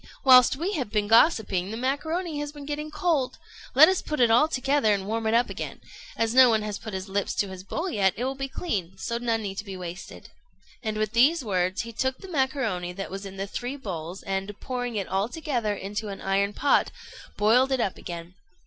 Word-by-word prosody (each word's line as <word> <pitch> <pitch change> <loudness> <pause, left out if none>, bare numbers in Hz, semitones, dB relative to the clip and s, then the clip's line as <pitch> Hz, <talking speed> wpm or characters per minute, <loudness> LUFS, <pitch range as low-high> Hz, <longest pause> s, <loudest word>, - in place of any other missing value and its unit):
whilst 255 -2 +7
we 345 +9 -2
have 265 - -2
been 210 -1 0
gossiping, 220 - +3
the 220 - -5
macaroni 310 +6 -2
has 295 0 -4
been 290 -1 -10
getting 300 +1 -4
cold. 305 -4 0 0.4
Let 300 +4 +10
us 380 -1 +1
put 300 - -4
it 240 -2 +5
all 245 +7 +5
together 270 -6 +2
and 195 -1 -5
warm 220 +2 -2
it 220 - +2
up 240 +1 +3
again. - - -6 0.4
As 225 0 +1
no 255 -1 +8
one 220 -2 +2
has 210 -1 -4
put 215 -3 -7
his 190 +1 -5
lips 200 +1 -2
to 200 - 0
his 190 -1 -8
bowl 325 - -3
yet, 200 - +1
it 240 - -2
will 260 - 0
all 270 - -5
be 270 0 -4
clean; 200 - -4
so 235 0 -3
none 230 -2 0
need 195 0 -4
be 195 -2 -7
wasted." 180 0 -8 0.5
And 215 -2 -3
with 215 -1 -1
these 265 +5 +4
words 185 -1 0
he 230 0 -8
took 260 +3 -1
the 385 - -11
macaroni 265 - -1
that 195 +1 -6
was 195 +1 -6
in 195 0 -10
the 195 - -2
three 245 +6 -5
bowls, 185 - -6
and, 195 +1 -4
pouring 245 -2 -4
it 200 -2 -2
altogether 225 - -1
into 205 +2 -5
an 200 -1 -6
iron 200 +1 0
pot, 285 +7 +2 0.5
boiled 245 +6 +4
it 265 - +1
up 200 -5 0
again. 170 0 -7
225 Hz, 220 wpm, -26 LUFS, 195-270 Hz, 0.5 s, Let